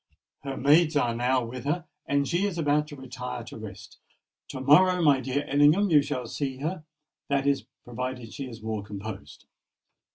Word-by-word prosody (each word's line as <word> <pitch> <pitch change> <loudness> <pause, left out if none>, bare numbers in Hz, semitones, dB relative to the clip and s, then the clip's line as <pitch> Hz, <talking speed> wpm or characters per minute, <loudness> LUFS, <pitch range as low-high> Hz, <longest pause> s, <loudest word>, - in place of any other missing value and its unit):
Her 135 -1 -5
maids 155 +3 +4
are 120 -5 +2
now 125 +1 +1
with 125 +2 -7
her, 160 +3 -1 0.2
and 140 0 +1
she 180 +4 +1
is 185 -4 -4
about 150 -1 +1
to 150 - -9
retire 125 -2 -6
to 115 - -10
rest. 105 -1 -10 0.5
To - - -6
morrow, 180 +7 +5
my 145 -3 +5
dear 135 +2 -2
Ellingham, 150 +8 +4
you 150 -2 +7
shall 140 -3 -3
see 135 +2 -3
her—that 150 -2 -4
is, 140 -1 +1 0.2
provided 125 -1 -5
she 135 -2 -6
is 115 -2 -11
more 110 -1 -2
composed." 100 -7 -8
135 Hz, 170 wpm, -27 LUFS, 120-150 Hz, 0.5 s, you